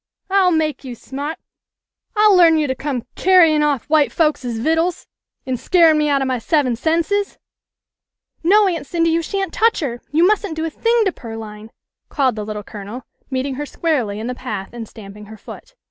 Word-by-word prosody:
" - - -54
I'll 385 -2 +4
make 310 -5 0
you 255 -3 -7
sma't! 285 +6 -6 0.8
I'll 420 -1 +5
learn 335 -3 +6
you 305 - +1
to 260 - -1
come 260 -3 -4
carry 360 -4 +5
in' 300 - +2
off 290 -5 0
white 300 -1 +3
folkses 280 -7 0
vittles 325 +8 0 0.4
an' 260 -1 -2
scarin' 330 +3 +4
me 300 0 +1
out 280 -1 +2
of - - -2
my 255 -1 -1
seven 260 -1 +1
senses! 335 - 0 0.3
" - - -69
" - - -68 0.3
No, 405 +4 +5
Aunt 335 -6 -3
Cindy, 330 0 +1
you 330 +1 +1
sha'n't 390 +4 -3
touch 455 +1 +2
her! 240 -5 -4
You 325 +4 +4
mustn't 405 -3 +1
do 320 0 -2
a 325 - -3
thing 460 +5 +1
to 385 - +1
Pearline," 220 -4 -9 0.4
called 265 -5 +1
the 215 - -4
Little 210 0 -6
Colonel, 210 +5 -8 0.3
meeting 265 0 -2
her - - -3
squarely 255 -11 -1
in 220 - -5
the 250 - -3
path 210 -6 -6
and 230 -2 -7
stamp 200 -2 -12
ing 210 0 -11
her 215 +1 -12
foot. - - -12
300 Hz, 210 wpm, -19 LUFS, 240-335 Hz, 0.8 s, learn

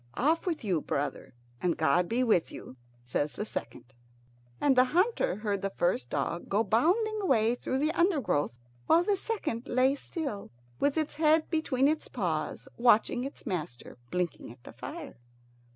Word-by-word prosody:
"Off 320 +8 +1
with 330 -7 -1
you, 180 -7 0
brother, 140 -3 -3 0.3
and 175 -2 +1
God 175 +2 +2
be 245 +3 +1
with 215 -9 +2
you," - - -10 0.3
says 145 +4 -1
the 210 - -4
second. 135 - -7 0.7
And 280 -2 +3
the 255 0 +6
hunter 405 - +2
heard 205 -2 -2
the 195 - -1
first 175 -10 0
dog 150 +5 -2
go 205 +3 +2
bounding 375 - +2
away 235 - +3
through 260 +1 -2
the 300 +3 +1
undergrowth, 285 - +1 0.3
while 335 - +5
the 405 +2 +2
second 315 - -3
lay 255 +2 +3
still, 280 -7 -5 0.3
with 285 +2 +1
its 310 -2 -1
head 315 0 +3
between 280 -5 +2
its 310 +1 0
paws, 170 -9 -3
watching 235 0 +3
its 275 - -8
master 155 - -5
blinking 180 -7 -3
at 120 0 -16
the - - -11
fire. - - -8
240 Hz, 165 wpm, -29 LUFS, -, 0.7 s, the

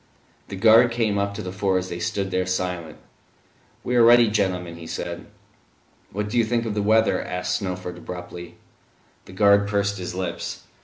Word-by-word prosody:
The - - -7
guard 115 +4 +6
came 115 -4 0
up 100 0 -2
to 110 - -5
the 90 - -5
four 95 0 0
as 95 0 -3
they 85 - -5
stood 95 +2 -2
there 90 0 0
silent. 90 -3 -3 0.9
"We 125 - -1
are 120 - +6
ready, 120 -1 +6
gentlemen," 90 -5 -1
he 85 -1 -10
said. - - -6 0.8
"What 105 +2 -3
do 120 +3 0
you - - +4
think 115 +1 -1
of 110 - -2
the 105 - -1
weather?" 110 -2 +3
asked 90 0 -2
Snowford 90 -2 -5
abruptly. 90 -1 -8 0.7
The - - -13
guard 100 +1 +4
pursed 100 -1 -1
his 90 0 -5
lips. 90 -2 -4
100 Hz, 185 wpm, -23 LUFS, 90-110 Hz, 0.9 s, guard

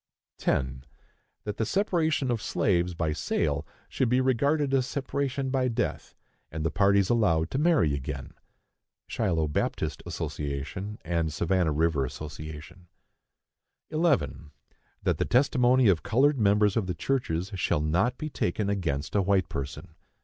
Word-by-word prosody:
10. 65 0 -1 0.6
That 105 -1 -4
the - - 0
separation 160 - +1
of 115 -3 -1
slaves 90 -4 +1
by 80 -2 -1
sale - - -1 0.2
should 125 - 0
be 125 +2 +3
regarded 140 +3 +1
as 130 -2 +2
separation 140 -1 -2
by 130 -1 +1
death, 120 - -3 0.4
and 80 0 -4
the 80 - +1
parties 100 +1 +3
allowed 85 -9 +2
to 135 - -1
marry 150 - +3
again. 70 0 -5 0.7
(Shiloh 80 -4 0
Baptist 75 - -2
Ass., - - -4 0.7
and 85 -1 0
Savannah 85 +1 +1
River 75 -2 +1
Ass.) 75 +3 -8
11. 80 +3 -10 2.1
That - - +1
the - - +1
testimony 125 -1 +4
of 90 -5 +4
colored 140 +3 +2
members 105 -1 +3
of 110 -5 0
the 90 - -2
churches 90 -4 -1
shall 90 -5 0
not 90 +11 +1
be 155 0 -5
taken 100 0 -1
against 80 -8 -2
a 100 - +3
white 95 0 +1
person. 70 -1 -6
100 Hz, 140 wpm, -27 LUFS, 80-130 Hz, 2.1 s, testimony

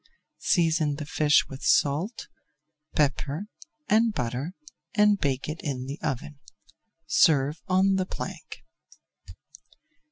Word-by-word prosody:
Season 160 -3 +2
the 150 0 -6
fish 150 0 +3
with 135 0 -9
salt, 155 - +1 0.7
pepper, 145 +4 0 0.4
and 220 0 +3
butter 125 +9 -3 0.4
and 210 -1 +4
bake 135 -1 -1
in 145 -4 -4
the 140 +4 -6
oven. 135 +2 -4 0.7
Serve 150 0 +3
on 190 +1 +3
the 185 - 0
plank. - - -7
150 Hz, 100 wpm, -26 LUFS, 140-185 Hz, 0.7 s, and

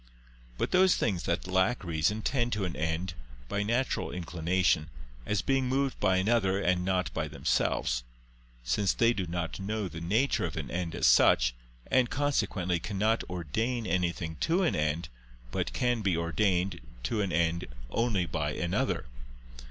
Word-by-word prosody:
But - - -1
those 185 0 +5
things 95 -6 -1
that 85 - -1
lack 95 +6 +1
reason 85 +6 0
tend 120 -1 0
to 105 -2 -1
an 85 - -4
end, 80 +2 -2 0.3
by 100 +9 -1
natural 120 +5 0
inclination, 85 -2 0 0.4
as 105 -1 0
being 135 -1 +1
moved 135 0 0
by 95 -2 +3
another 95 -1 +2
and 90 -2 +1
not 90 -1 0
by 80 -1 -2
themselves; - - 0 0.6
since 60 +12 +1
they 115 0 +4
do 95 -5 -3
not 85 0 -3
know 105 +1 -2
the 80 -2 -8
nature 110 +11 +1
of - - -5
an - - -4
end 85 -2 -3
as - - 0
such, - - +5 0.3
and 125 -2 +3
consequently 100 -11 0
cannot 105 +5 0
ordain 110 - -2
anything 85 -3 -1
to 175 +3 +2
an 170 - +2
end, 75 +2 0 0.4
but - - -2
can 120 -2 0
be 95 -5 +1
ordained 90 +1 0 0.2
to 105 - 0
an 100 -3 -1
end 85 0 +1 0.2
only 110 - +1
by 75 -2 -2
another. 85 +2 -1
95 Hz, 160 wpm, -29 LUFS, 85-110 Hz, 0.6 s, those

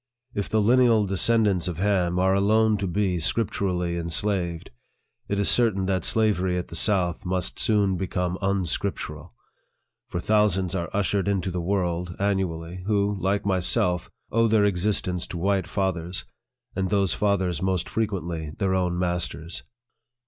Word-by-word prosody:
If 100 - -3
the 110 -1 +2
lineal 115 -2 +4
descendants 100 -1 +2
of 90 -3 -4
Ham 90 -2 +1
are 95 +1 +3
alone 110 +2 +3
to 100 -1 -2
be 95 -1 0
scripturally 90 -2 -1
en 85 0 -4
slaved, 85 -2 -2 0.6
it 100 - -1
is 100 - +2
certain 110 -6 +3
that 95 -2 0
slavery 95 -5 +2
at 90 - -4
the - - -7
south 90 -4 +1
must 90 0 -2
soon 100 -4 +2
become 90 0 -2
unscri 95 0 0
plural; - - -8 0.7
for 85 - -3
thousands 95 -2 +2
are 85 -3 -2
ushered 100 -1 0
into 95 -2 0
the 90 0 -2
world, 90 -1 -1
annually, 90 -3 -2
who, 105 -1 +1
like 95 +3 0
myself, 90 -2 +1 0.2
owe 115 +1 +3
their 110 -2 +3
ex 90 -3 0
istence 90 -4 -1
to 90 - -6
white 95 0 0
fathers, 90 -2 -2 0.5
and 95 -1 -1
those 100 -4 +2
fathers 95 -5 0
most 95 -2 0
fre 110 - 0
quently 85 -6 -5
their 95 -2 0
own 90 -2 0
masters. 90 -2 -2
95 Hz, 155 wpm, -25 LUFS, 90-100 Hz, 0.7 s, lineal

